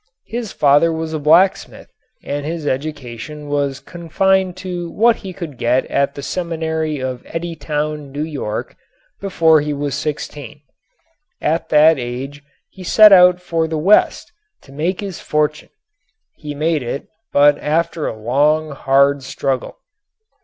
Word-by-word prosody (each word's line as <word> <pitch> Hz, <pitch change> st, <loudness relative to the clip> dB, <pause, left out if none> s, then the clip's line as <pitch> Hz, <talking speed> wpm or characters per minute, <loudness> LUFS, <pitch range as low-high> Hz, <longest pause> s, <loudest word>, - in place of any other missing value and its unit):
His 230 Hz, -2 st, -5 dB
father 145 Hz, +3 st, +3 dB
was 160 Hz, 0 st, -4 dB
a 155 Hz, -, -2 dB
blacksmith 165 Hz, +6 st, +2 dB, 0.3 s
and 145 Hz, 0 st, -4 dB
his 160 Hz, +1 st, -4 dB
education 145 Hz, 0 st, -5 dB
was 140 Hz, -1 st, -1 dB
confined 180 Hz, +4 st, 0 dB
to 180 Hz, -2 st, -5 dB
what 230 Hz, +5 st, +3 dB
he 190 Hz, -, -8 dB
could 170 Hz, -8 st, -8 dB
get 125 Hz, +2 st, +1 dB
at 140 Hz, 0 st, 0 dB
the 140 Hz, -, -7 dB
seminary 160 Hz, -3 st, -3 dB
of 130 Hz, -1 st, -4 dB
Eddytown, 150 Hz, -3 st, -4 dB
New 145 Hz, +2 st, -3 dB
York, 140 Hz, -9 st, -5 dB, 0.4 s
before 165 Hz, -5 st, +3 dB
he 150 Hz, 0 st, -2 dB
was 145 Hz, -1 st, -3 dB
sixteen. 145 Hz, -2 st, -5 dB, 0.8 s
At 160 Hz, +3 st, -1 dB
that 155 Hz, 0 st, +5 dB
age 130 Hz, +4 st, -6 dB, 0.3 s
he 190 Hz, -, -11 dB
set 210 Hz, +3 st, +7 dB
out 180 Hz, -1 st, +6 dB
for 165 Hz, -2 st, -1 dB
the 160 Hz, 0 st, -3 dB
West 190 Hz, +8 st, +3 dB, 0.3 s
to 135 Hz, -, -17 dB
make 165 Hz, +8 st, -2 dB
his 195 Hz, -4 st, -6 dB
fortune. 150 Hz, 0 st, -1 dB, 0.7 s
He 150 Hz, -1 st, -7 dB
made 155 Hz, +1 st, 0 dB
it, 125 Hz, +3 st, -5 dB, 0.2 s
but 145 Hz, 0 st, +4 dB
after 160 Hz, +1 st, -1 dB
a 110 Hz, -, -5 dB
long, 150 Hz, +7 st, +1 dB
hard 140 Hz, +1 st, +2 dB
struggle. 130 Hz, 0 st, -3 dB
150 Hz, 140 wpm, -18 LUFS, 140-170 Hz, 0.8 s, set